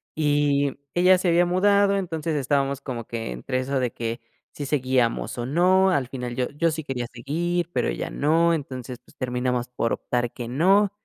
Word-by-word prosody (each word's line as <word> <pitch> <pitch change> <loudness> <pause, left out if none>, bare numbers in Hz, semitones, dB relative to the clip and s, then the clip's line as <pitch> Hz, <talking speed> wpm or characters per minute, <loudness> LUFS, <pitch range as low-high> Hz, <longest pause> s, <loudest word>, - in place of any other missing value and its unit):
Y 145 -2 +1 0.2
ella 180 +1 +5
se 185 - -1
había 175 +1 +4
mudado, 200 +2 +3
entonces 165 -4 -2
estábamos 140 -1 0
como 120 -4 -5
que 115 - -5
entre 60 - -3
eso 135 +1 -1
de 125 -2 -1
que, 115 +1 -4 0.3
si 145 - -5
seguíamos 130 -5 0
o 120 - -2
no, 185 +7 +4
al 140 -8 +1
final 125 -2 -5
yo 125 -1 0
yo 165 +3 0
sí 160 0 -4
quería 130 -3 -3
seguir, 170 +7 -2
pero - - +1
ella - - -3
no, 165 +3 +2
entonces, 130 -4 -6
pues, - - -21
terminamos 125 -1 -1
por 120 -2 -1
optar 120 -1 -2
que 120 - -7
no. 190 - +3
140 Hz, 185 wpm, -24 LUFS, 125-170 Hz, 0.3 s, ella